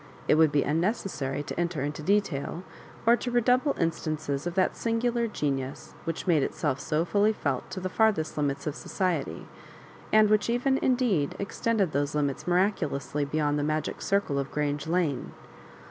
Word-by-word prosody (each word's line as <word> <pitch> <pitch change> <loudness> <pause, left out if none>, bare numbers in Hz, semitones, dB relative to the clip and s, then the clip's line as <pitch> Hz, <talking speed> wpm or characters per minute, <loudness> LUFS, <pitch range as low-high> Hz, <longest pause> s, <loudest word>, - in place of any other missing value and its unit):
It - - +5
would 155 -1 +5
be 145 -1 +3
unnecessary 150 - -1
to 150 - -5
enter 170 -5 -1
into 145 +1 -3
detail, 175 -3 0 0.4
or 235 +1 +7
to 245 - -4
redouble 250 +4 +2
instances 155 -2 -1
of 175 - -4
that 185 -1 +2
sin 230 0 -1
gular 235 -1 0
genius 135 -4 -3
which 165 - -3
made 165 -5 +3
itself 135 0 -1
so 155 +2 0
fully 205 +4 +3
felt 140 -10 -2
to 185 0 -5
the 185 - -2
Sirthest 200 -5 +1
limits, 145 -2 -1
of 150 -2 -2
society, 165 - -2 0.7
and 215 0 +6
which 215 +1 +2
even 260 +3 +2
indeed 240 - +1
extended 200 -2 0
those 145 0 -1
limits 145 0 -1
miraculously 175 -6 0
beyond 150 0 0
the - - 0
magic 155 +1 -2
circle 195 -8 +1
of 140 - -3
Grange 145 0 -2
Lane. 160 -6 0
165 Hz, 165 wpm, -28 LUFS, 145-210 Hz, 0.7 s, or